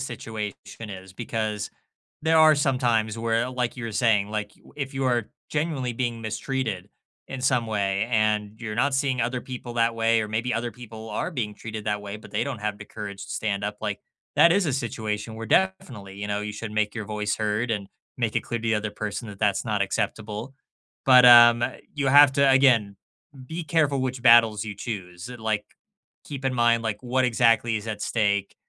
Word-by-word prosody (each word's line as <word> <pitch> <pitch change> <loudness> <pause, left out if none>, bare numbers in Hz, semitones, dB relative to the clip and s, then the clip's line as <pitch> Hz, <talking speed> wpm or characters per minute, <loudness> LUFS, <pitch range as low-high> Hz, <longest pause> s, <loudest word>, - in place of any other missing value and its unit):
situation 110 -4 -5 0.4
is, 95 -1 -9
because 110 -1 -3 0.5
there 160 0 +4
are 155 -1 +7
some 140 -3 +1
times 115 -3 +1
where, 115 +2 0
like 125 -1 -2
you 125 - -6
were 115 - -5
saying, 105 -2 +2
like, 105 -1 -4
you - - -20
if 135 -2 -4
you 135 - -1
are 120 -4 0 0.2
genuinely 150 -5 -1
being 120 -1 -2
mistreated, 110 -3 -3 0.4
in 135 - -6
some 125 -2 +2
way, 100 -2 0
and 110 -1 +1
you're 110 -3 -5
not 135 +4 +1
seeing 135 -2 0
other 125 +2 -1
people 125 -2 -7
that 115 0 +2
way, 115 0 +2
or - - -3
maybe 115 +3 -1
other 120 +1 -2
people 110 -2 -10
are 105 - -2
being 115 -10 -3
treated 110 -1 -7
that 105 -1 -1
way, 100 0 -6
but 105 - -14
they 105 - -1
don't 135 -5 -4
have 105 -1 -3
the - - -10
courage 100 -2 -7
to - - -12
stand 100 -2 -2
up, 105 0 -3
like 105 -2 -3 0.4
That 170 - +7
is 195 -1 +2
a 145 - 0
situation 110 -3 -3
where, 115 0 -6
definitely, 120 - 0
you 100 +1 -4
know, 105 0 -1
you 105 0 -4
should 110 0 -6
make 105 -1 0
your 110 - -4
voice 105 0 -2
heard 110 +2 -1
and 100 -2 -3 0.3
make 115 -3 -1
it - - +3
clear 120 -1 -4
the 115 -1 0
other 105 0 -2
person 105 +3 -5
that 100 -2 -10
that's 105 -2 +1
not 105 -3 0
acceptable. 105 +5 -3 0.5
But, 125 -1 +7
um, 120 -1 +8 0.3
you 140 -2 -1
have 145 +1 +8
to 140 -1 +4
again, 120 -7 +4 0.5
be 165 +3 -5
careful 145 -3 +1
which 130 -1 -3
battles 115 -3 +6
you 105 -2 -6
choose. 95 -2 -6
Like, 110 -3 -2 0.6
keep 140 -2 -7
in 130 - 0
mind, 120 -1 +3
like, 110 +1 -3
what 130 +1 +1
exactly 115 -1 +3
is 110 +1 -6
at 105 -1 -4
stake, 100 -3 0
115 Hz, 205 wpm, -25 LUFS, 105-125 Hz, 0.6 s, um